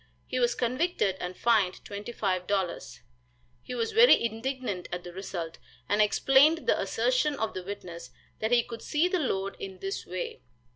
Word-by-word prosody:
He 255 - -2
was 240 -1 +2
convicted 250 - 0
and 180 +1 -5
fined 215 -6 +3
$25. 200 -3 -2 0.6
He 250 - -6
was 230 -2 -1
very 470 +2 +7
indignant 230 -4 -3
at 175 0 -4
the 175 - -9
result, 175 -3 -5 0.3
and 205 +2 +3
explained 270 +9 +4
the - - +2
assertion - - +1
of 220 -5 -2
the 185 - -4
witness, 180 -7 -8 0.3
that 220 - 0
he 240 -1 +5
could 230 -1 -8
see 310 +4 +1
the 365 0 0
load, 195 -9 -1
in 190 -1 -7
this 195 +1 -4
way. 180 0 -5
215 Hz, 160 wpm, -28 LUFS, 185-260 Hz, 0.6 s, very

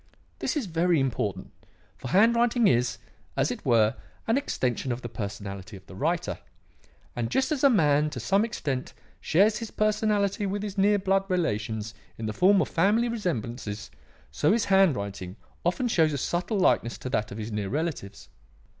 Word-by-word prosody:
This 325 - -1
is 275 - -1
very 170 -1 +2
important; 105 -8 -2 0.4
for 130 - -8
handwriting 235 - +4
is, 120 0 +2 0.4
as - - +2
it - - -6
were, 115 -1 +3 0.3
an 225 - +2
extension 130 - -1
of 120 +1 -4
the 120 - -5
personality 100 -2 -6
of 95 - -17
the - - -13
writer. 165 - -1 0.8
And 115 -1 -2
just 265 - 0
as 290 -3 -1
a 280 - +8
man 150 - +3
to - - -6
some 195 +2 +2
extent 140 - -3 0.3
snares 205 +6 +3
his 230 - -6
personality 210 -1 +1
with 200 +1 -3
his 205 -2 -5
near 205 +1 +3
blood 195 0 +1
relations 110 - -1 0.2
in 110 - -5
the 110 - -2
form 190 - +4
of - - -5
family 210 +8 +2
resemblances, 120 - -4 0.4
so 150 - +2
his 230 -1 +1
handwriting 100 - +1 0.3
often 180 +9 0
shows 160 -9 +2
a - - -1
subtle 175 - -1
likeness 150 -10 +2
to 130 - -6
that 105 -4 -1
of 100 - -7
his 110 +1 -5
near 105 -2 -3
relatives. 140 - -4
160 Hz, 170 wpm, -27 LUFS, -, 0.8 s, a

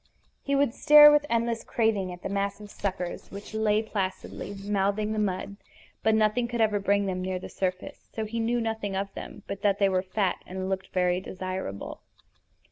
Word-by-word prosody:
He 280 - 0
would 275 -4 +2
stare 295 +1 +9
with 295 0 +3
endless 230 0 0
craving 215 -5 0
at 175 0 -10
the - - -2
massive 200 +1 -3
suckers 185 -3 -4
which 200 +2 -9
lay 215 0 +2
placidly 200 -1 -4
mouthing 205 +1 0
the 215 - -1
mud; 200 0 -2 0.4
but 220 0 +3
nothing 220 +3 +2
could 235 0 -4
ever 210 -2 +3
bring 200 0 +2
them 185 -1 -2
near 185 0 -2
the 180 - -8
surface, 185 -1 -4
so 220 - -3
he 230 +2 -4
knew 235 +2 +1
nothing 220 -3 -2
of 195 0 -3
them - - -9
but 200 0 -6
that 200 -1 +2
they 200 -1 +3
were 185 -1 +1
fat 190 0 -1
and 185 +1 -4
looked 190 -1 -2
very 180 0 +1
desirable. 185 - -5
200 Hz, 190 wpm, -27 LUFS, 190-220 Hz, 0.4 s, stare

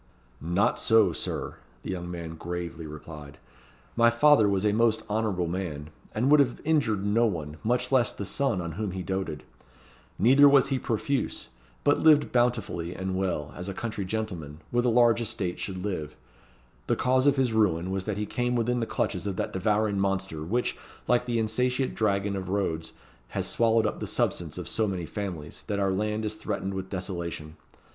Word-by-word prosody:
"Not 85 +5 +1
so, 110 -1 +4
Sir," - - -4 0.3
the - - -4
young 90 -1 -4
man 85 -2 -6
gravely 85 -1 -5
replied; 75 -1 -10 0.6
"my 120 0 +5
father 120 -2 +5
was 100 0 0
a 105 - +3
most 115 0 +2
honourable 105 -4 0
man, 80 -4 -4 0.2
and 125 +6 +2
would 150 - +7
have 130 -4 +2
injured 130 -11 +1
no 115 +3 +3
one, 80 -6 -4
much 120 +4 0
less 125 -4 +3
the 100 - -6
son 120 -1 0
on 85 -1 -4
whom 100 +2 -3
he 95 -1 -4
doated. 95 -6 -3 0.7
Neither 135 +5 +7
was 140 -1 +5
he 135 -2 0
profuse; 125 - -2 0.3
but - - +3
lived 150 -2 +5
bountifully 115 -8 0
and 95 0 -3
well, 85 -6 -2
as 90 +2 -5
a 95 - -5
country 110 -3 -3
gentleman, 90 -7 -4
with 120 0 +1
a - - +4
large 120 0 +4
estate, 105 -6 -3
should 95 -1 -4
live. 75 -7 -3 0.7
The - - +2
cause 130 +2 +2
of 140 - +5
his 130 -4 +1
ruin 95 -5 +2
was 95 -1 -2
that 105 -2 -2
he 105 - -1
came 125 +3 -1
within 120 +1 +1
the 115 - -1
clutches 95 +1 -2
of 100 - -2
that - - -3
devouring 105 +1 +1
monster, 95 -4 -1
which, 115 +10 -1 0.3
like 125 0 +3
the 120 -1 0
insatiate 125 +4 0
dragon 100 -2 0
of 95 -1 -4
Rhodes, 90 -5 -2 0.3
has - - -3
swallowed 115 -1 +2
up - - -2
the - - -4
substance - - -1
of - - -5
so 110 -1 0
many 90 -4 -3
families, 90 -6 -6
that 105 -2 -1
our 100 -1 +2
land 105 +3 -1
is 105 - -1
threatened 105 -2 -3
with 95 0 -5
desolation. 85 -4 -5
100 Hz, 185 wpm, -27 LUFS, 90-115 Hz, 0.7 s, would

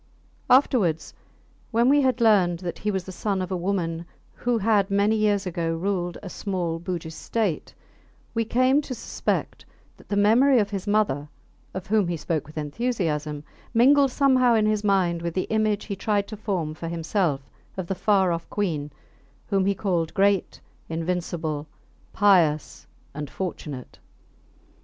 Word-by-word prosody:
Afterwards, 235 - +3 0.6
when 235 +1 +2
we 285 +2 +5
had 260 -3 +1
learned 195 -6 +4
that 175 -1 -6
he 210 - -2
was 190 -3 -1
the 190 - -8
son 195 +1 -2
of 185 0 -4
a - - 0
woman 170 -2 -2 0.3
who 245 -1 0
had 210 -2 +2
many 200 +2 +2
years 205 -2 +1
ago 165 -2 -2
ruled 175 0 -2
a - - -6
small 180 -4 -3
Bugis 170 -2 -5
state, 205 -2 -2 0.6
we 230 -1 +1
came 255 +5 +3
to 265 -3 -6
suspect - - -3 0.3
that - - -19
the 205 - 0
memory 235 +7 +5
of 205 -2 +1
his 195 0 -4
mother 200 -9 +1 0.5
(of 190 -1 -4
whom 210 -2 +2
he 170 -1 -2
spoke 155 -2 -2
with 155 - -13
enthusiasm) 150 -4 -2 0.3
mingled 275 +4 +5
somehow 255 -3 +4
in 215 -1 +3
his 215 -1 +1
mind 185 -4 +2
with 170 -1 -4
the 185 - 0
image 215 -1 +1
he 200 - -4
tried 200 0 0
to 215 - -6
form 185 -7 -2
for 165 +2 -7
himself 165 -3 -1 0.4
of 185 - -3
the 195 - -2
far 190 -1 +2
off 170 0 -4
Queen 160 -8 -2 0.6
whom 195 -2 +2
he 200 - +2
called 175 -5 -1
Great, 200 -1 +2 0.3
Invincible, 165 -2 -3 0.4
Pious, 175 -7 +2 0.3
and 150 -1 -5
Fortunate. 150 -8 -6
195 Hz, 160 wpm, -25 LUFS, 170-215 Hz, 0.6 s, we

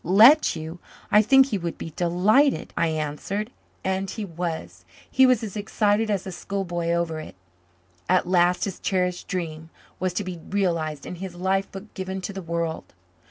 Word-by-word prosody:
"Let 225 - +7
you! 160 +2 -7 0.3
I 210 - +7
think 270 +5 +6
he 220 -7 -2
would 170 -1 -4
be 165 - -6
delighted," 200 +11 +2
I 165 - +2
answered. 160 +8 -3 0.3
And 190 0 -1
he 215 +1 -4
was. 160 - -5 0.2
He 265 0 +5
was 250 -3 +3
as 210 -2 -5
excited 210 +1 +1
as 200 -3 0
a 190 - -5
schoolboy 175 -3 -3
over 170 -2 0
it. 155 - -9 0.7
At 185 -1 +3
last 180 0 +3
his 195 - -5
cherished 180 -2 -1
dream 160 -3 -4 0.3
was 185 -1 -1
to 205 - -1
be 185 -2 -6
realized 165 -7 -1
and 180 - -7
his 190 -2 -6
life 190 +2 0
book 195 +2 -10
given 190 0 -4
to 200 - -5
the 195 - -5
world. 170 - -3
185 Hz, 175 wpm, -25 LUFS, 170-205 Hz, 0.7 s, Let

